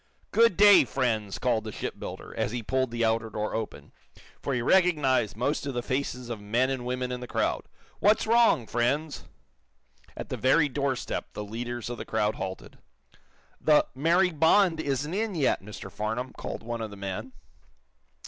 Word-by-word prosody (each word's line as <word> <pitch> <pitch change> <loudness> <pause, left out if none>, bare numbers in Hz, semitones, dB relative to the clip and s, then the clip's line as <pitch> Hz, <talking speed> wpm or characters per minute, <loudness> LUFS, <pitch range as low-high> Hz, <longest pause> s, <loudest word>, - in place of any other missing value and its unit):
"Good 230 -5 +4
day, 205 0 +8
friends!" 115 -7 -1
called 120 -4 0
the 110 - -6
shipbuilder, - - -6
as - - -1
he 120 -1 -4
pulled 130 +3 0
the 115 0 0
outer 115 0 0
door 105 0 -3
open, 110 -1 -5 0.5
for 140 - -1
he 120 - 0
recognized 150 - +3
most 140 +4 -1
of 135 - -4
the 120 - -2
faces 130 -2 -3
of 115 -3 -5
men 120 +6 +1
and 125 -2 -3
women 125 0 -2
in 125 - -3
the 125 - -7
crowd. - - -1 0.3
"What's 210 +2 +3
wrong, 230 - +4
friends!" 135 +7 -1 0.9
At - - -6
the - - -3
very 145 +4 +4
doorstep 140 -1 -3
the 105 - -5
leaders 120 +2 -5
of 120 0 -5
the - - -5
crowd 110 -1 0
halted. 95 0 -7 0.8
"The 150 -1 +5
'Mary 170 +7 +3
Bond' 165 +2 +4
isn't 145 +1 -2
in 210 0 -1
yet, 145 -5 +1
Mr. 105 +2 -9
Farnum," 110 +4 -3
called - - -6
one 120 0 -4
of 110 - -4
the 100 - -11
men. 100 +6 -5
125 Hz, 175 wpm, -27 LUFS, 110-150 Hz, 0.9 s, day